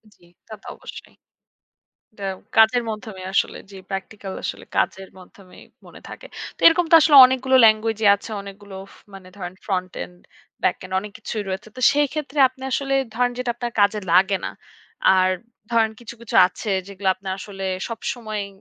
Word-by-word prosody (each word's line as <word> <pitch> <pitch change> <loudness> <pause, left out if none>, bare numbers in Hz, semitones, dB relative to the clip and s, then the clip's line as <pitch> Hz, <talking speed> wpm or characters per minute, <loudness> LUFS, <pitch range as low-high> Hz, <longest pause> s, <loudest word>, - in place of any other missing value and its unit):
জি, - - -29 0.2
তা 220 - -10
তো - - -13
অবশ্যই। - - -12 1.0
এটা 200 -2 -8 0.3
কাজের 225 +2 +5
মাধ্যমেই 210 -4 -7
আসলে - - 0
যে 195 - -11
প্র্যাকটিক্যাল 195 0 -6
আসলে - - -5
কাজের 190 0 -1
মাধ্যমেই 185 0 -16 0.2
মনে - - -14
থাকে। - - -10 0.3
তো - - -44
এরকম 340 +1 +4
তো 330 - +9
আসলে 295 -2 +5
অনেকগুলো 260 +1 +1
ল্যাঙ্গুয়েজই 220 0 +2
আছে। 200 - -12
অনেকগুলো 200 0 -11 0.2
ফ - - -18 0.2
মানে 190 -1 -12
ধরেন 180 -1 -6
ফ্রন্ট 185 -3 -2
এন্ড, 180 - -13 0.5
ব্যাক - - +2
এন্ড 185 0 -8
অনেক 210 +1 -9
কিছুই 215 -1 -5
রয়েছে। 190 +3 -5
তো 255 - -8
সেই 290 0 +2
ক্ষেত্রে 300 -1 -4
আপনি 260 +1 -21
আসলে 275 0 -1 0.2
ধরেন 245 +1 +1
যেটা 250 -1 -3
আপনার 240 -1 -4
কাজে 205 +1 +3
লাগে 190 +2 +4
না। - - -4 0.6
আর 185 0 +3 0.4
ধরেন 225 -1 +2
কিছু, 235 -1 -10
কিছু 235 - -6
আছে 200 +4 -7 0.2
যেগুলো 195 -1 -2
আপনার 190 0 -5
আসলে 195 0 -8 0.3
সবসময়ই 215 -2 -5
210 Hz, 170 wpm, -22 LUFS, 190-240 Hz, 1.0 s, তো